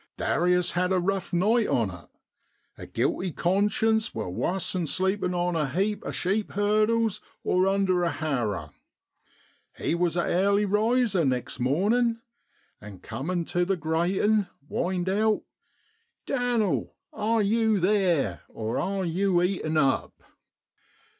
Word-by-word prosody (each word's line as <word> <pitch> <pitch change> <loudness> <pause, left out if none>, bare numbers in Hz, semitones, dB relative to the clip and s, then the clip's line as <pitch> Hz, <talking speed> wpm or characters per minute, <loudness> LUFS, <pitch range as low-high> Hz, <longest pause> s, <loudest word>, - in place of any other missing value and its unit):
Darius 180 +1 +1
had 180 +1 0
a 190 - +3
rough 195 +1 -2
night 210 +6 +2
on 115 -8 +1
it. 85 -1 -13 0.7
A - - -10
guilty 185 -1 -1
conscience 210 +6 +1
wor'wuss 110 - -2
'an 180 -3 -1
sleepin' 190 +1 0
on 175 0 0
a 150 -4 0
heap 200 +8 -1
o' - - -5
sheep 200 +4 -1
hurdles 215 +2 +1 0.2
or 185 +1 +2
under 195 -2 +2
a 170 - +2
harrer. 125 -12 -2 1.1
He - - -1
was 175 0 0
a 175 - 0
airly 200 +3 +2
riser 215 -1 +2
next 130 -3 -2
mornin', 215 - +1 0.6
and 100 -3 -11
cumin' 170 +4 -3
tu 175 +1 0
the 190 +1 0
gratin 180 +6 +1 0.2
whined 180 +2 -2
out, 215 +3 +1
i 455 +2 -18
Dan'l 245 -6 0 0.2
are 220 +1 +1
yew 220 0 +2
theer, 185 -5 +1
or 110 0 -3
are 195 0 -1
yew 180 +2 +1
eaten 175 -4 -1
up 135 -3 +1
185 Hz, 135 wpm, -26 LUFS, 170-210 Hz, 1.1 s, a